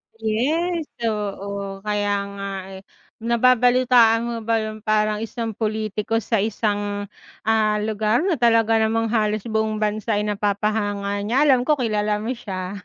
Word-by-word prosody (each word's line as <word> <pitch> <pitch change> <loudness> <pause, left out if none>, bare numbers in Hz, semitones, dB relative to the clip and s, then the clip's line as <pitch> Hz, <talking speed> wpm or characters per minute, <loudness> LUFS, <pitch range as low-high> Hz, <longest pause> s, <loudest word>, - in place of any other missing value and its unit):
Yes, 300 +10 -1 0.2
oo 200 -2 -4
kaya 205 -1 0 0.2
nga, 200 0 -6 0.2
eh. 190 0 -9 0.4
Nababalitaan 245 0 +4
mo 235 - -3
ba 230 -1 +1
yung 215 0 -5
parang 215 0 +2
isang 225 +1 -4
pulitiko 215 0 -1
sa 225 - 0
isang, 205 -1 -1 0.3
ah, 215 -1 +2
lugar 215 +4 +1
na 360 -6 +1
talaga 225 -1 +3
namang 225 0 +1
halos 215 -2 0
buong 220 0 -1
bansa 215 +1 -1
ay 210 - 0
napapahanga 205 0 -1
niya 245 +7 +2
alam 255 -4 +4
ko 305 - +4
kilala 210 -3 0
mo 225 - -4
siya. 190 -2 -5
215 Hz, 140 wpm, -22 LUFS, 210-230 Hz, 0.4 s, Nababalitaan